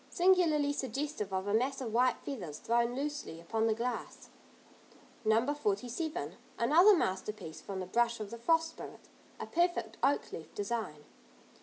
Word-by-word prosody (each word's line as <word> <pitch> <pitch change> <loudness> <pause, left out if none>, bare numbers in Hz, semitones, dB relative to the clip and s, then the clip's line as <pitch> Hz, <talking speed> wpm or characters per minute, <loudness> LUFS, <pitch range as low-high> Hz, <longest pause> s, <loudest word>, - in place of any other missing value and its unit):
Singularly 335 -6 +3
suggestive 275 -6 -3
of 190 0 -1
a 205 - -1
mass 260 +5 +1
of 235 -5 -4
white 250 +1 +4
feathers 180 - -5
thrown 235 +4 +1
loosely 290 - -4
upon 220 +7 0
the 220 - +2
glass. 240 +2 -4 0.9
No. 225 +6 +3
47. 245 - -2 0.2
Another 340 - +6
masterpiece 190 - -3
from 195 -1 -5
the 185 - -3
brush 235 +4 +1
of 210 -2 -6
the 235 - -7
Frost 325 +5 +3
Spirit, - - -11 0.3
a - - -4
perfect 325 -11 0
oak 280 +3 +1
leaf 160 - -9
design. 205 -8 -3
235 Hz, 150 wpm, -32 LUFS, 210-290 Hz, 0.9 s, Another